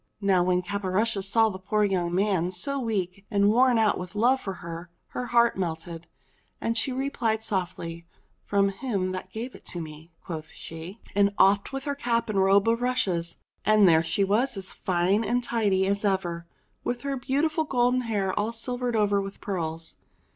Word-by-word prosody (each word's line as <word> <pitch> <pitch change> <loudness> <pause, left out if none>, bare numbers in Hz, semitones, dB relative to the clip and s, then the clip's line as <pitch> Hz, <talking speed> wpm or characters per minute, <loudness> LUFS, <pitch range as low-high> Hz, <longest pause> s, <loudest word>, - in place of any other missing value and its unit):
Now 195 -3 +3
when 180 0 +1
Caporushes 200 +1 0
saw 225 0 +4
the 190 -2 -7
poor 210 +3 0
young 180 -4 0
man 190 -3 +1
so 235 +10 -3
weak 200 -5 -2
and 200 -2 +3
worn 250 +1 +4 0.2
with 180 +2 -7
love 250 +5 +3
for 195 - -4
her, 170 0 -8 0.2
her 250 - -4
heart 235 -3 +3
melted, 165 -1 -4 0.5
and 230 - -1
she 225 +3 +1
replied 250 -4 -1
softly: 175 -4 -3 0.4
"From 200 -1 +2
him 195 -3 -2
that 185 0 -6
gave 235 +4 -5
it - - -7
me," 160 0 -8
quoth 160 -3 -5
she, 165 +6 -9
and 200 0 +3
offed 200 +3 +4
with 270 0 -4
her 285 -1 -1
cap 235 -5 0
and 200 - +1
robe 195 +2 +4
of 230 +1 +2
rushes, 195 -10 0 0.3
and 215 -2 +5
there 160 -2 +6
she 165 +4 0
was 220 +5 +1
as 190 -1 -4
fine 185 +4 +1
and 245 +2 0
tidy 205 -5 +1
as 200 +1 0
ever 175 -4 -1 0.4
with 245 0 -2
her 280 -1 -2
beautiful 290 +5 0
golden 250 -2 +2
hair 205 -5 -1
all 210 +2 0
silvered 245 +1 -2
over 205 -2 +2
with 195 0 -7
pearls. 165 -4 -4
200 Hz, 175 wpm, -26 LUFS, 180-235 Hz, 0.5 s, there